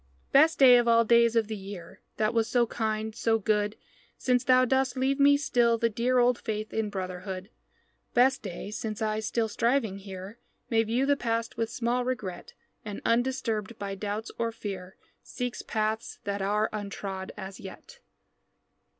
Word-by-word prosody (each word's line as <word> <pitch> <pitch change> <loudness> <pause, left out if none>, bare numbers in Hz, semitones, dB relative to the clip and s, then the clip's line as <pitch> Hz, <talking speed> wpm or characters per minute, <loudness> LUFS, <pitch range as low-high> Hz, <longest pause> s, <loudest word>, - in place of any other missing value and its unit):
Best 310 +4 +5
day 255 -3 +8
of 240 - 0
all 230 0 +5
days 235 0 +4
of 225 -2 +2
the 220 - -4
year, 195 -3 -9 0.2
That 215 +1 +1
was 225 -1 +1
so 240 -1 +3
kind, 220 -1 -2
so 225 +1 +1
good, 210 0 0 0.4
Since 250 -1 +1
thou 255 0 +5
dost 265 0 +1
leave 270 +2 +1
me 285 0 +6
still 240 -5 +2
the 230 0 +1
dear 245 +3 +1
Old 245 0 +3
faith 215 0 -4
in 220 -1 -1
brotherhood 185 +1 -5 0.6
Best 260 +2 +4
day 195 +1 -6
since 215 0 -4
I, 215 -1 -1
still 225 +1 -1
striving 230 -2 0
here, 195 +2 -9 0.3
May 225 -1 +4
view 230 +4 0
the 285 +1 +3
past 230 -3 -2
with 225 -1 -1
small 240 +1 -1
regret, 215 -8 -4 0.3
And, 210 -2 -6
undisturbed 230 -3 0
by 200 -1 -4
doubts 205 +2 -4
or 230 0 0
fear, 195 -4 -7 0.3
Seeks 245 -1 -5
paths 220 0 -2
that 200 0 -3
are 210 +2 +1
untrod 200 -2 -5
as 190 -1 -7
yet. 190 - -11
225 Hz, 165 wpm, -28 LUFS, 205-240 Hz, 0.6 s, day